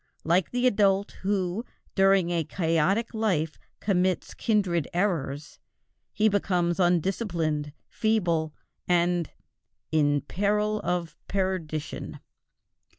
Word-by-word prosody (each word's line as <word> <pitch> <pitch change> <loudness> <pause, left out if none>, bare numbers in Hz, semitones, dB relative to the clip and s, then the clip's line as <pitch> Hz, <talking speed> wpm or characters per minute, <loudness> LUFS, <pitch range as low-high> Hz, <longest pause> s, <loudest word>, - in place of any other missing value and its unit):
Like 170 +2 +2
the 245 +1 0
adult 200 -4 +3
who 195 +1 -1 0.3
during 195 -2 +4
a 170 -2 +1
chaotic 170 +8 0
life 180 -9 0 0.2
commits 185 -2 0
kindred 190 -8 +1
errors, 160 -6 -1 0.5
he 220 - +2
becomes 180 -4 +1
undisciplined, 175 -4 0 0.2
feeble, 175 -8 0 0.4
and 175 -2 +2 0.6
"in 145 -2 +3
peril 210 +4 0
of 175 -2 -2
perdition." 180 -6 -3
180 Hz, 90 wpm, -27 LUFS, 165-200 Hz, 0.6 s, during